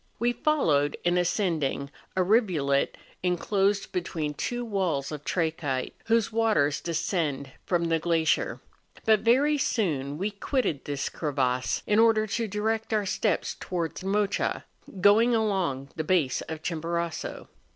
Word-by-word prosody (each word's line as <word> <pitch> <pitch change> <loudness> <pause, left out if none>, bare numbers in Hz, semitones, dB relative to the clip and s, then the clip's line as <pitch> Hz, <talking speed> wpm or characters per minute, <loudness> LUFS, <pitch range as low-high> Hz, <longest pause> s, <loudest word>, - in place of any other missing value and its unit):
We 240 +1 +1
followed, 160 - +2
in 175 0 +2
ascending, 165 -7 0 0.2
a 185 - +3
rivulet 180 - +2 0.2
enclosed 195 +3 +1
between 165 -5 -2
two 240 +10 -3
walls 180 -11 -1
of 150 -1 -6
trachyte, 155 -5 -1
whose 230 -1 +2
waters 215 -11 +2
descend 155 -5 -2 0.2
from 175 -2 +1
the 165 -1 +1
glacier; 165 -1 +1 0.5
but 220 -1 +5
very 275 +7 +3
soon 150 - 0
we 200 +5 -1
quitted 200 - -1
this 140 -1 -2
crevasse, 130 -7 -1
in 210 +1 +3
order 225 -1 +5
to 225 +2 -2
direct 220 +2 -1
our 210 -2 +1
steps 195 0 0
towards 170 -1 -3
Mocha, 200 +1 0 0.4
going 225 +5 +5
along 185 -12 0
the 155 - -2
base 155 -6 +1
of 160 -1 -6
Chimborazo. 170 0 -3
180 Hz, 130 wpm, -27 LUFS, 150-215 Hz, 0.5 s, but